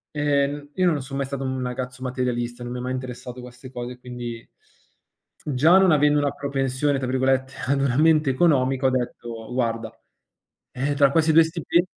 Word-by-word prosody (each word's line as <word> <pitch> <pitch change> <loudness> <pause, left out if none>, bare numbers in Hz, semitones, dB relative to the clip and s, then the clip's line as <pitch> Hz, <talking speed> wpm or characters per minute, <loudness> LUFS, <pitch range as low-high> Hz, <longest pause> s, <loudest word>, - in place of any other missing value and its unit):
Ehm, 145 -1 +2
n 145 0 -13
io 185 -2 +3
non 150 -3 -1
son 135 +1 -6
mai 140 - -1
stato 135 0 -5
un 130 -1 -2
ragazzo 125 0 -5
materialista, 125 -1 -2
non 120 - -6
mi - - -4
ha - - -5
mai 125 +1 -3
interessato 125 -1 -6
queste 125 +1 -12
cose, 125 0 -6
quindi 120 -2 -7 1.0
già 150 +6 +4
non 190 -1 +5
avendo 150 -1 +4
una 145 -1 +1
propensione 140 0 -1
tra 130 - -3
virgolette, 130 +1 +1
ad 140 +1 +1
una 130 -2 +1
mente 155 -1 +4
economica, 135 -3 +2
ho - - +4
detto: 120 -2 -4
"Guarda 115 -3 -1 0.8
eh, 135 +3 -1
tra 140 -1 +5
questi 160 +1 +3
2 165 +1 +8
stipen" 170 +2 0
130 Hz, 185 wpm, -23 LUFS, 125-145 Hz, 1.0 s, 2